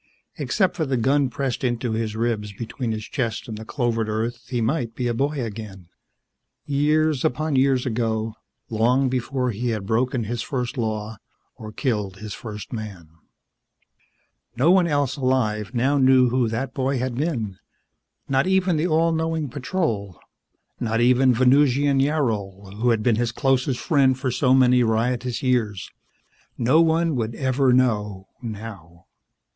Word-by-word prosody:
Except 190 -3 0
for 165 - -1
the 130 -1 0
gun 135 +3 +2
pressed 135 +1 -3
into 120 -1 -1
his 110 -1 -2
ribs 110 -3 -2
between 115 +3 -4
his 110 -1 -4
chest 115 -6 -3
and 110 - -5
the 110 - -7
clovered 115 -2 -1
earth, 115 +3 -3
he 125 - -1
might 120 -1 -1
be 125 - -3
a 120 - 0
boy 140 +5 -1
again, 105 -5 -8 0.8
years 150 0 +1
upon 155 +3 0
years 130 -1 +2
ago, 110 -2 -1 0.3
long 125 +4 +2
before 125 0 -1
he 120 +3 -3
had 110 -4 -2
broken 120 +3 0
his 115 +2 -3
first 125 -1 -3
law 110 -2 -3 0.4
or 110 -1 -9
killed 105 -6 -2
his 105 0 -7
first 105 -1 -8
man. 100 -8 -7 1.5
No 135 +8 +4
one 185 -2 +4
else 145 -3 0
alive 125 -4 0
now 135 +4 +2
knew 130 -1 +5
who 125 -1 +1
that 125 +4 -3
boy 135 -1 0
had 130 0 -2
been. 120 - -2 0.7
Not 135 +4 +1
even 190 -3 +2
the 160 +3 +1
all 165 0 +2
knowing 160 -2 -1
Patrol. 120 - -3 0.6
Not 115 -1 -1
even 125 +2 +4
Venusian 135 +2 +3
Yarol, 105 -10 -1
who 120 +3 +1
had 115 -2 +1
been 115 -2 +2
his 120 0 0
closest 135 0 0
friend 135 -6 +3
for 130 -1 -2
so 130 +1 +3
many 125 -1 +5
riotous 120 +2 0
years. 115 -7 0 0.7
No 130 +7 +4
one 165 -1 +2
would 115 -1 -2
ever 130 0 +2
know 105 -6 +1
now. 100 -7 -9
125 Hz, 155 wpm, -23 LUFS, 110-135 Hz, 1.5 s, knew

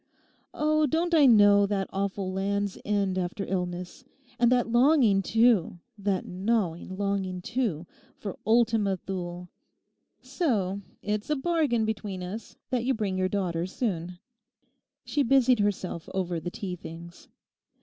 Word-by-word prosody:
Oh, 305 0 +2
don't 335 +4 0
I 300 -4 +6
know 205 -3 +6
that 195 -1 -1
awful 195 -1 -2
Land's 200 +1 -1
End 200 -2 0
after 185 +2 -3
illness; 180 +3 -4 0.4
and 240 0 +4
that 245 -2 +3
longing, 240 -5 +4
too, 225 -4 +3 0.2
that 200 -2 -1
gnawing 185 -2 -1
longing, 195 -2 -1
too, 195 -6 -2 0.3
for 200 -3 -7
Ultima 220 -3 +2
Thule. 180 -1 -6 0.7
So, 200 - -1 0.2
it's 210 +3 -2
a 300 - +2
bargain 285 -6 +1
between 205 -4 -4
us 205 +5 -7
that 250 -2 0
you 265 +2 +1
bring 205 -4 -2
your 185 0 0
daughter 180 -4 -1
soon.' 180 -5 -3 0.9
She 295 - 0
busied 260 -2 +4
herself 185 -5 -2
over 180 -3 -1
the 175 - -5
tea 185 -1 -5
things. 170 0 -11
200 Hz, 135 wpm, -27 LUFS, 185-235 Hz, 0.9 s, I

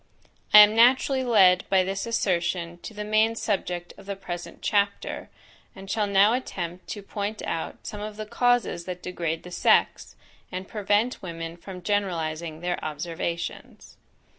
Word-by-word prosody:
I 210 - +11
am 210 +1 +6
naturally 260 +3 +4
led 195 -7 +4
by 190 -1 +4
this 195 +4 -3
assertion 175 -5 -1
to 220 - -9
the 210 - -4
main 215 +2 +2
subject 180 -5 -2
of 195 - -15
the 200 - -3
present 175 -2 -7
chapter, 200 -1 -1 0.5
and 195 0 -8
shall 210 -2 +1
now 200 +2 +5
attempt 180 -8 -4
to 205 - -6
point 205 +1 -4
out 165 - -4
some 210 - -6
of 210 0 -6
the 215 - -5
causes 245 -6 +1
that 180 -1 -6
degrade 165 -3 -3
the 180 - -10
sex, - - +2 0.4
and 185 +1 -5
prevent 210 +3 0
women 165 -2 -6
from 180 +1 -10
generalizing 170 -5 -2
their 175 0 -2
observations. 170 +2 -5
195 Hz, 155 wpm, -26 LUFS, 175-210 Hz, 0.5 s, I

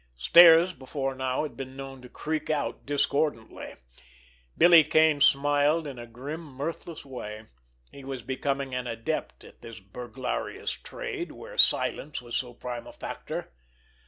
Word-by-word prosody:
Stairs 170 - +8
before 135 -1 -4
now 130 +1 -1
had 145 -6 -6
been 130 +1 -7
known 135 -1 -8
to 125 - -12
creak 155 +3 -4
out 150 -3 -2
discordantly! 145 -4 -1 0.8
Billy 170 -1 +8
Kane 155 -1 +3
smiled 145 +3 +3
in 135 -4 -7
a 120 - -8
grim, 140 +8 -7
mirthless 155 +3 -6
way. 110 -5 -7 0.5
He 140 - -12
was 135 -3 -6
becoming 135 +1 -2
an 125 0 -3
adept 115 -1 -4
at - - -16
this 115 -1 -10
burglarious 120 +5 -5
trade 360 -4 -6
where - - -11
silence 150 - +2
was 120 -1 -7
so 125 -1 -2
prime 120 -1 -6
a - - -9
factor. - - -6
135 Hz, 145 wpm, -27 LUFS, 125-155 Hz, 0.8 s, Stairs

